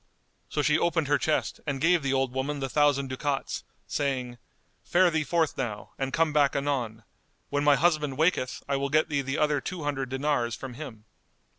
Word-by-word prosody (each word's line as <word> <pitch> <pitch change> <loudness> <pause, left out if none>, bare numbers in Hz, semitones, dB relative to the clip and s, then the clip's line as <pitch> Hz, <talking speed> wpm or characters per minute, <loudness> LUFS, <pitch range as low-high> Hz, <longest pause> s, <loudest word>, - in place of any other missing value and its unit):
So 150 - -1
she 150 +1 +3
opened 165 -3 +1
her 145 - +3
chest 155 - 0
and 140 -2 -1
gave 170 +3 +4
the 135 -1 -1
old 135 -1 +1
woman 140 +2 -2
the 135 - -2
thousand 145 -2 +3
ducats, 135 +1 -2 0.2
saying, 125 -4 -2 0.4
"Fare 180 0 +4
thee 160 -1 +1
forth 165 0 +1
now 105 -3 -4
and 135 0 -1
come 160 +1 +2
back 145 -2 +3
anon; 125 -6 -1 0.5
when 145 0 +1
my 145 -1 +6
husband 150 -4 +1
waketh, 160 -5 +1
I 140 0 +1
will 140 0 -1
get 155 +2 +2
thee 145 -2 +1
the 135 +1 -3
other 150 -2 +2
two 180 -1 -5
hundred 135 -3 -2
dinars 130 -4 0
from 130 +1 -7
him." 120 -6 -9
140 Hz, 190 wpm, -27 LUFS, 135-150 Hz, 0.5 s, my